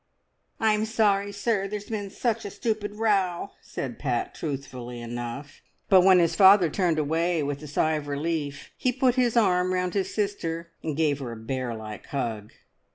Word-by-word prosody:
"I'm 215 -1 +2
sorry, 205 -2 +2
sir, 200 -1 0
there's 205 +2 -6
been 205 -2 -3
such 230 +2 -1
a - - -5
stupid 210 -1 -3
row," 200 -5 +1
said 125 -3 -6
Pat 125 -5 -1
truthfully 130 -5 -5
enough; 120 +4 -6 0.3
but 190 -2 +7
when 185 0 +6
his 170 -2 +3
father 190 -4 +7
turned 175 -3 +1
away 160 +2 +1
with 140 0 -3
a 150 - -8
sigh 155 +2 +1
of 145 -1 -6
relief, 145 0 -3
he 255 - +1
put 255 0 +2
his 245 -2 +2
arm 185 -4 +3
round 180 -1 -1
his 195 -2 -1
sister 170 -5 -2
and 155 -3 -3
gave 150 -3 +2
her 125 -4 -5
a - - -8
bear 120 +1 -3
like 110 -2 -8
hug. 115 -6 -3
170 Hz, 175 wpm, -26 LUFS, 140-205 Hz, 0.3 s, but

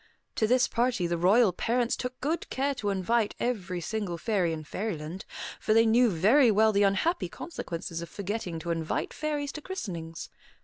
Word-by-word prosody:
To 220 - +3
this 250 +2 +4
party 235 -6 0
the 170 0 0
royal 200 +3 +5
parents 235 +5 0
took 250 0 -5
good 315 +4 -2
care 275 +2 0
to 210 -6 -3
invite 205 +3 +1
every 195 -7 -2
single 195 -1 -3
fairy 185 -3 0
in 160 -1 -4
Fairyland, 175 0 -5 0.3
for 215 - +1
they 225 0 +6
knew 235 +2 +5
very 220 - +5
well 220 +1 +4
the 200 -1 +2
unhappy 205 - +2
consequences 170 - -6
of 170 - -7
forgetting 200 -2 -4
to 170 - -3
invite 165 -1 -2
fairies 295 -2 -2
to 305 - -7
christenings. 175 - -6
215 Hz, 175 wpm, -28 LUFS, 175-245 Hz, 0.3 s, they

